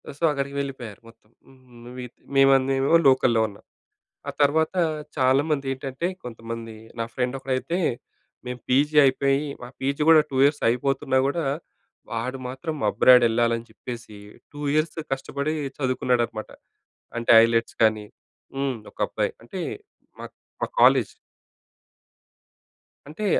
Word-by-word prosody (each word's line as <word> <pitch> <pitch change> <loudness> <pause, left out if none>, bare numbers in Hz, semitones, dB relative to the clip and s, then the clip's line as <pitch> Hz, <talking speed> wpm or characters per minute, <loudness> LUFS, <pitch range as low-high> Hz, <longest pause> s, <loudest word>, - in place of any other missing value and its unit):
ఆ - - -5
సో, - - -9
అక్కడికి 140 -1 -3
వెళ్ళిపోయారు 130 -7 -6
మొత్తం. 115 -2 -20 0.2
హ్మ్ 135 - -19 0.3
నువ్వీ 125 +1 -8 0.3
మేమందెమో 135 +2 +4
లోకల్‌లో 130 -4 +4
ఉన్నాం. 100 -1 -14 0.7
ఆ - - -3
తర్వాత 155 +2 +2 0.4
చాలామందేంటంటే 135 +1 0 0.2
కొంతమంది 115 -1 -7 0.3
నా 115 - 0
ఫ్రెండ్ 125 +1 -1
ఒకడైతే 135 +6 -2 0.7
మేము 125 0 -5
పీజీ 145 +4 +2
అయిపోయి, 135 +2 +1 0.2
మా 120 - -7
పీజీ 140 +2 -2
కూడా 160 -1 +8
2 135 - -3
ఇయర్స్ 145 +1 +2
అయిపోతున్నా 130 +2 0
కూడా 165 +4 -1 0.7
వాడు 115 +4 -3
మాత్రం 145 +5 -5
అబ్రాడ్ 125 -1 +6
ఎళ్ళాలని 115 0 0
చెప్పేసి 115 -1 -9 0.3
2 145 - -11
ఇయర్స్ 155 +1 0
కష్టపడి 140 +3 -2 0.2
చదువుకున్నాడన్నమాట. 125 -4 -1 0.7
అంటే 115 - +1
ఐలెట్స్ 115 0 0
కానీ 110 -1 +2 0.5
హ్మ్, 135 -1 -1 0.2
ఒక - - -30
అబ్బాయి - - -2
అంటే 150 +11 -7 0.6
మా - - -6 0.4
మా - - 0
కాలేజ్. - - +5 1.9
అంటే 215 - -5
130 Hz, 120 wpm, -24 LUFS, 120-140 Hz, 1.9 s, కూడా